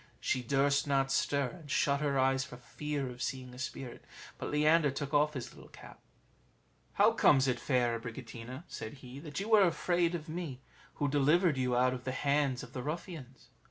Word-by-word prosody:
She 130 - 0
durst 140 +3 +2
not 135 -1 +2
stir, 140 -1 +1
and 150 -3 -14
shut 140 -1 +2
her 140 -2 +1
eyes 135 0 +3
for 125 - -10
fear 145 +2 -4
of 125 0 -8
seeing 130 -2 -4
a 125 - -11
spirit. 130 -1 -6 0.4
But - - -4
Leander 150 +1 +4
took 140 +1 -4
off 150 +1 +3
his 130 - -5
little - - -14
cap: - - -13 0.9
"How - - +5
comes 135 -2 +4
it, 125 -2 0
fair 120 -4 +1
Abricotina," 120 +3 -8
said 110 - -7
he, 125 +2 -9
"that 150 +1 -6
you 215 +3 -1
are 215 - +8
afraid 175 +1 +1
of 165 -1 -6
me, 160 -5 -5 0.4
who 145 - 0
delivered 150 +4 +3
you 125 -1 +1
out 125 +1 +3
of 125 -1 -6
the 130 - -3
hands 140 -2 +1
of - - -11
the 125 - -4
ruffians?" 150 -3 -7
140 Hz, 195 wpm, -32 LUFS, 130-150 Hz, 0.9 s, are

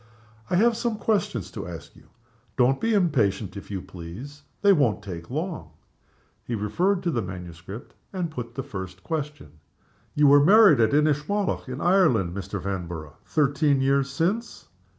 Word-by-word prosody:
I - - +1
have 230 +5 +4
some 235 -1 -2
questions 155 - -1
to - - -6
ask 85 -2 -9
you. - - -19 0.5
Don't 130 +2 +3
be 225 -1 +2
impatient, 110 - +1
if 100 - -9
you 95 -3 -4
please. 100 - -10 0.2
They 200 -1 +7
won't 120 - +1
take 85 -4 -8
long." 150 - -4 0.7
He 120 - -3
referred 175 - 0
to 175 - 0
the 120 - 0
manuscript, 90 +2 -8 0.2
and 180 -4 -3
put 120 -5 -7
the 135 - -3
first 95 -3 -8
question. 145 - -5 0.6
"You 150 - +4
were 145 0 +7
married 200 - +7
at 115 +4 +3
Inchmallock, 150 +4 0
in 130 +3 -5
Ireland, 145 - +3
Mr. 100 +1 -5
Vanborough, 85 -5 -5
thirteen 145 -1 +2
years 135 +1 +2
since?" 180 - -2
135 Hz, 155 wpm, -25 LUFS, -, 0.7 s, They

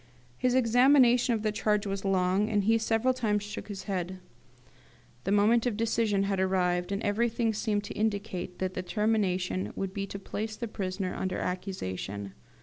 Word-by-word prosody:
His 250 - +1
examination 245 0 +5
of 215 - -4
the 215 - +1
charge 210 0 0
was 195 -1 -3
long, 190 +2 +2
and 205 -2 +1
he 225 +3 +3
several 225 +3 +2
times 210 -5 0
shook 205 - -7
his 200 -2 -6
head. 185 -2 -3 1.1
The 195 - 0
moment 220 +4 +4
of 220 -4 -1
decision 220 -3 +1
had 195 -1 -1
arrived, 180 -1 +1
and 200 - -2
everything 225 +2 +1
seemed 210 -1 -1
to - - -6
indicate 200 -4 -2
that 185 0 -2
the 185 - -3
termination 185 - 0
would 195 -1 -3
be 200 0 -3
to 200 - -6
place 215 +2 -5
the 235 - -4
prisoner 190 -3 -3
under 185 -1 -2
accusation. 100 - -4
205 Hz, 170 wpm, -29 LUFS, 185-225 Hz, 1.1 s, examination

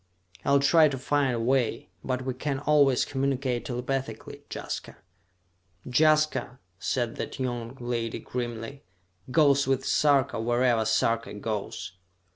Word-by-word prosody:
I'll 140 0 +4
try 160 +2 +6
to 140 -2 -3
find 135 -1 +1
a - - -2
way, 120 -5 0
but 130 0 -2
we 130 - -1
can 140 +2 -2
always 145 -2 +3
communicate 135 -2 -1
telepathically. 125 -2 -4
Jaska...." - - -6 0.9
"Jaska," 155 -2 +2 0.2
said 120 -3 -1
that - - -5
young 120 -1 -3
lady 120 -2 -2
grimly, 120 +2 -5 0.5
"goes 140 -1 +4
with 135 0 +1
Sarka 140 -6 +2
wherever 120 -1 +2
Sarka 115 0 +1
goes!" 100 -3 -5
130 Hz, 120 wpm, -27 LUFS, 120-140 Hz, 0.9 s, try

